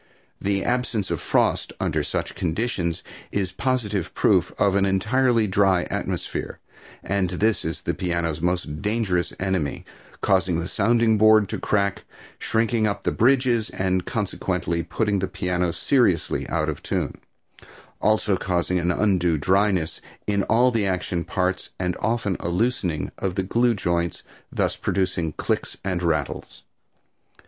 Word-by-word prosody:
The 100 0 0
absence 120 -5 -1
of - - -2
frost - - +1
under - - 0
such - - -3
conditions 85 -1 -2 0.3
is 95 -3 -1
positive 105 -5 -1
proof - - +3
of 100 -2 +3
an 100 - +3
entirely 115 +5 +2
dry 95 -2 +3
atmosphere, - - -3 0.5
and 95 -2 0
this 105 +5 +1
is 80 0 -4
a - - 0
piano's 85 -3 -2
most 85 -4 -1
dangerous 105 -4 0
enemy, 95 -7 -1 0.3
causing 95 -3 +2
the 85 - -3
sounding 115 0 +2
board 110 -1 +6
to - - -3
crack, 100 -2 0 0.3
shrinking 110 0 +1
up 100 -1 -3
the - - +1
bridges, 125 -2 +3
and 95 -1 0
consequently 85 0 -1
putting 100 +4 0
the 95 - -1
piano 90 -2 -1
seriously 95 - +1
out - - 0
of - - -3
tune, - - -3 0.8
also 110 -2 +2
causing 90 0 0
an 85 0 0
undue 90 -4 +2
dryness 95 +1 +1 0.2
in 100 -1 +1
all 120 +3 +4
the 110 -4 +1
action 90 -2 -1
parts 90 +1 -1
and 90 -1 -1
often 110 -5 0
a 85 - -3
loosening 90 - 0
of 95 -2 -2
the 95 - 0
glue 120 +5 +2
joints, 85 -3 -1 0.3
thus - - 0
producing 90 -4 -1
clicks - - -2
and 90 -2 -1
rattles. 80 -5 -2
95 Hz, 140 wpm, -24 LUFS, 90-110 Hz, 0.8 s, board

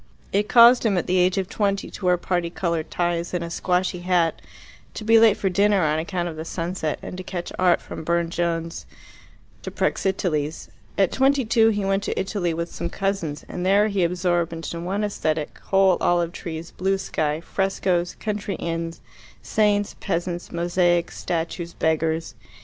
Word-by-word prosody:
It 205 +1 +1
caused 240 +1 +7
him 210 -5 +2
at 175 - 0
the 185 0 +2
age 180 +2 +3
of 190 -1 0
twenty 200 -1 -1
to 190 - -7
wear 180 0 +4
parti 175 -1 -1
coloured 170 -2 -2
ties 175 0 -1
and 175 - -1
a 170 - -6
squashy 180 0 0
hat, 175 -2 +1 0.5
to - - -5
be 225 +1 +6
late 220 -2 +5
for 195 - -1
dinner 200 +1 +3
on 155 0 +1
account 175 +1 -2
of 160 -2 -6
the 160 - -4
sunset, 165 -2 -3
and - - -6
to 185 - -6
catch 175 -1 -5
art 180 -2 +4
from - - -8
Burne 170 0 0
Jones 170 -1 -2 0.7
to - - -5
Praxiteles. 165 -6 -1 0.3
At 195 -2 +3
twenty 270 0 +2
two 225 0 +4
he 205 -2 -1
went 195 0 +1
to - - -2
Italy 190 -3 -1
with 170 +1 -4
some 170 - -3
cousins, 195 -6 -2
and 180 - -5
there 200 +3 +4
he 200 -3 +1
absorbed 175 -1 0
into 165 0 -5
one 195 +4 -2
aesthetic 155 -7 -2
whole 190 -2 +4
olive 175 -1 +2
trees, 165 -1 -7
blue 195 +2 0
sky, 155 -5 -1
frescoes, 185 -1 -1
country 205 -2 -3
inns, 165 0 -4 0.4
saints, 205 -1 +1
peasants, 175 -2 -3
mosaics, 175 0 +1
statues, 170 0 -3
beggars. 160 0 0
180 Hz, 175 wpm, -23 LUFS, 170-195 Hz, 0.7 s, caused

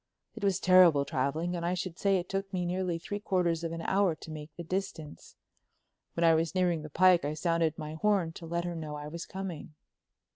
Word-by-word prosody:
It 225 - -9
was 195 -3 +2
terrible 175 -6 +6
traveling, 155 +8 -1
and 170 - -4
I 175 +2 0
should 180 -1 -5
say 195 -1 +3
it 175 0 -4
took 195 0 -3
me 180 -2 -1
nearly 180 -1 -1
three 205 +4 -5
quarters 175 -4 0
of 165 - -2
an 165 0 -5
hour 190 -4 +2
to 160 - -11
make 155 -1 -7
the 170 - -7
distance. 165 -4 -5 0.8
When 170 - 0
I 165 -1 +6
was 165 +2 0
nearing 175 -3 +1
the 155 - -8
pike 180 +3 +5
I 150 +1 -2
sounded 165 -1 0
my 155 -2 -6
horn 190 0 +1
to 165 0 -10
let 170 +1 -2
her 175 - -3
know 155 -2 -5
I 150 0 -6
was 170 +2 -7
coming. 180 -5 -6
170 Hz, 220 wpm, -30 LUFS, 160-185 Hz, 0.8 s, terrible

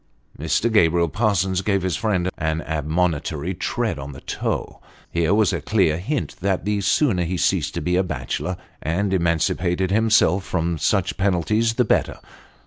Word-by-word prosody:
Mr. 80 +10 0
Gabriel 85 -4 +4
Parsons 95 -2 +1
gave 100 -2 0
his 95 -3 0
friend 95 -5 0
an 80 0 -1
admonitory 80 +1 -1
tread 100 - -2
on 70 +1 -7
the 65 - -11
toe. - - -3 0.3
Here 85 0 +1
was 105 -1 +3
a - - -2
clear 90 -8 +1
hint 135 +9 -3
that 95 0 0
the 105 -1 0
sooner 95 - +2
he 90 +2 -2
ceased - - 0
to - - -2
be 90 0 0
a 95 - +3
bachelor 90 0 -3 0.2
and 95 +5 -1
emancipated 85 +1 +1
himself 105 -4 +3
from 85 -3 -2
such 95 +2 0
penalties, 105 +4 +1
the 125 - +2
better. - - +1
90 Hz, 160 wpm, -22 LUFS, 85-100 Hz, 0.3 s, Gabriel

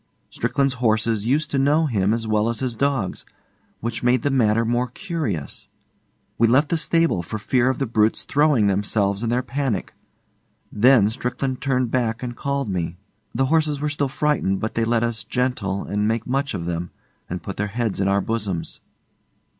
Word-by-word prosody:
Strickland's 135 -1 0
horses 110 -1 +1
used 145 +4 +1
to 140 - +1
know 150 +4 +3
him 105 -8 +1
as 115 0 -1
well 110 +1 +2
as 115 - -1
his 130 -2 -1
dogs; 135 -6 -1 0.6
which 115 0 -3
made 125 -1 +2
the 145 - +1
matter 115 -3 +3
more 120 +2 +1
curious. 120 - -4 0.7
We 115 - +5
left 135 +6 +3
the 170 - +1
stable 165 - +1
for 100 +5 -5
fear 125 +4 +1
of 130 - -1
the 135 - 0
brutes 110 -2 +1
throwing 145 -6 +3
themselves 100 0 +1
in 115 - -1
their 125 +2 +1
panic. 130 -7 -2 0.8
Then 120 -1 +5
Strickland 125 +3 -3
turned 130 -3 0
back 120 -2 0
and 120 -1 -4
called 140 -1 -2
me. 90 -3 -3 0.4
The 135 +3 +2
horses 155 -3 +2
were 150 +1 -1
still 145 -1 -1
frightened, 145 -9 0
but 110 +1 -3
they 115 - 0
let 115 0 +1
us 115 -3 -2
'gentle' 110 -5 -1
and 105 +1 -1
make 115 +1 -1
much 135 -1 -1
of 85 -3 -4
them, 85 0 -3 0.4
and 90 -1 -5
put 100 - -6
their 105 - -1
heads 110 -1 -2
in 100 - +1
our 100 0 +2
bosoms. 100 -6 -3
115 Hz, 185 wpm, -22 LUFS, 105-135 Hz, 0.8 s, We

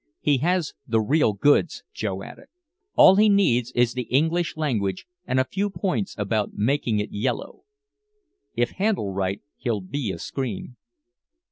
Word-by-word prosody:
He 145 -3 +2
has 175 +2 0
the 115 -2 +2
real 120 +1 +2
goods," 145 - +2
Joe 95 -3 -3
added. 275 - -12 0.5
"All 190 +1 +8
he 215 +1 +5
needs 125 - +3
is 120 -1 +3
the 125 -2 -4
English 160 +6 +1
language 105 -12 -1 0.2
and 130 0 +1
a - - +4
few 200 +6 -2
points 195 0 -2
about 105 0 -1
making 115 0 +1
it 105 +1 -2
yellow. 105 - -3 1.0
If 120 0 +1
handled 190 - -1
right 95 0 -2
he'll 110 -4 -2
be 110 +3 -3
a 90 - -6
scream." 125 +3 -5
125 Hz, 150 wpm, -24 LUFS, 105-160 Hz, 1.0 s, All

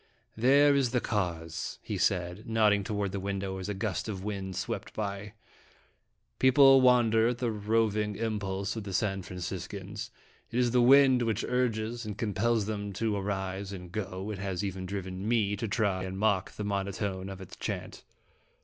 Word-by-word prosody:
" 115 0 -42
There 145 +2 +6
is 135 -3 +2
the 125 +1 +1
cause," 85 -8 -3
he - - -4
said, 90 +3 0
nodding 105 -2 +3
toward 105 -2 -2
the 100 - -3
window 95 0 -3
as 95 +2 -5
a 105 - -2
gust 105 +1 -2
of 95 -3 -5
wind 95 -3 -4
swept - - -4
by. 100 -1 -4 0.5
" - - -43
People 135 +1 +7
wonder 115 -3 +5
at 120 0 0
the 120 -2 -1
roving 105 -1 0
impulse 105 -2 -2
of 110 - -4
the 100 -1 -6
San 95 -3 0
Franciscans. 95 +3 -6 0.4
It 115 - -4
is 125 -1 +3
the 125 0 +4
wind 130 0 +6
which 115 -2 0
urges 120 -2 -1
and 105 -2 -6
compels 110 +1 +1
them 100 -1 -4
to 110 +1 -1
arise 95 -1 -3
and 90 -3 -8
go; 95 0 -4
it 100 - -5
has 95 -1 -3
even 95 -2 -4
driven 95 0 -4
me 110 -3 +2
to 110 +3 -3
try 100 -3 0
and 95 0 -5
mock 100 -2 +1
the 105 - -5
monotone 100 -1 -2
of 95 -1 -7
its 95 - -10
chant." - - -5
105 Hz, 180 wpm, -29 LUFS, 95-115 Hz, 0.5 s, People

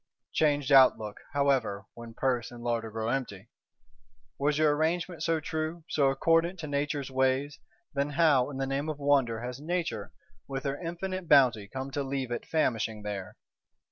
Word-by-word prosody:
Changed 145 -2 +2
outlook, 130 -6 +5
however, 130 -8 +1
when 115 -1 -10
purse 125 -3 0
and 120 -1 -11
larder 115 -2 -1
grow 110 +1 -3
empty! 115 -5 -3 0.9
Was 145 +1 +1
your 155 -1 +4
Arrangement 165 +2 -1
so 165 0 +1
true, 155 +2 -4
so 140 -3 +3
accordant 165 +6 +2
to 155 - -5
Nature's 145 -1 -2
ways, 130 +2 +1 0.3
then 140 +1 0
how, 145 -4 +3
in 140 - -6
the 135 - -1
name 140 +3 -2
of 155 - -3
wonder, 135 -6 +2
has 125 +1 -5
Nature, 175 +2 -2 0.4
with 135 -1 -4
her 140 +2 -3
infinite 180 +1 -4
bounty, 125 -8 +5
come 130 +4 -6
to 145 - -2
leave 135 -2 -3
it 120 - -4
famishing 115 -8 0
there? 100 -3 -5
140 Hz, 165 wpm, -29 LUFS, 120-155 Hz, 0.9 s, outlook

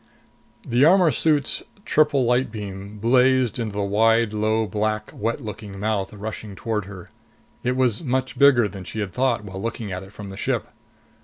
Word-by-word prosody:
The 120 +3 +2
armor 175 +1 +6
suit's 150 +3 +1 0.2
triple 145 -4 +3
light 125 0 +2
beam 100 -1 -7
blazed 125 +1 +3
into 110 -3 -3
the 100 - 0
wide, 115 +2 +3
low, 110 +1 +1
black, 110 0 -2
wet 115 +5 -2
looking 105 -3 -7
mouth 105 -2 -1
rushing 105 -1 -7
toward 105 -1 -2
her. 95 -3 -11 0.5
It 125 +1 0
was 125 -2 +1
much 130 -1 -2
bigger 135 -6 +6
than 95 -1 -8
she 100 +4 -6
had 100 -3 -3
thought 125 -4 0
when 95 -2 -9
looking 110 0 -4
at 90 0 -4
it 95 0 -12
from 105 -2 -9
the 95 - -9
ship. - - -1
110 Hz, 175 wpm, -23 LUFS, 100-125 Hz, 0.5 s, armor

